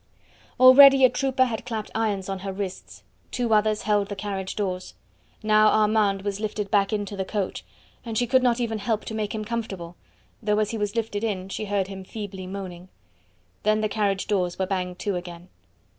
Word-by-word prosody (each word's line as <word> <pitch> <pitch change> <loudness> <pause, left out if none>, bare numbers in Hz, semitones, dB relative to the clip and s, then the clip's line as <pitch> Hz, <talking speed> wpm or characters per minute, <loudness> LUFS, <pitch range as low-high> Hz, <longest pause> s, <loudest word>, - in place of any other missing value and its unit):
Already 265 +1 +9
a 250 - +4
trooper 260 0 +1
had 230 -3 -4
clapped 225 -3 -5
irons 210 -4 -1
on 195 -1 -4
her 195 +1 -5
wrists, 190 -1 -7 0.3
two 240 -3 -1
others 215 0 +2
held 205 -1 +1
the 205 - -4
carriage 195 -2 -4
doors. 185 -3 -3 0.5
Now 215 0 +5
Armand 210 -2 +2
was 200 0 -3
lifted 210 -2 -3
back 200 -2 +3
into 205 -1 -3
the 190 - -2
coach, 195 0 -3 0.4
and 225 -2 -4
she 245 - +2
could 260 +1 +3
not 245 -1 +2
even 225 -2 -2
help 215 0 -2
to - - -6
make 215 -1 -3
him 215 -1 -4
comfortable, 195 -7 -5 0.5
though 210 0 +1
as 215 -1 0
he 230 - -3
was 205 +1 -2
lifted 220 -2 -2
in 195 -4 -2
she 215 - -4
heard 200 -1 0
him 195 -1 -8
feebly 190 -2 -7
moaning. 185 -2 -7 0.7
Then 215 +1 +2
the 215 - 0
carriage 200 -2 0
doors 180 -4 -1
were 190 - 0
banged 180 -2 -3
to 200 +1 -2
again. 175 0 -9
210 Hz, 195 wpm, -25 LUFS, 195-220 Hz, 0.7 s, Already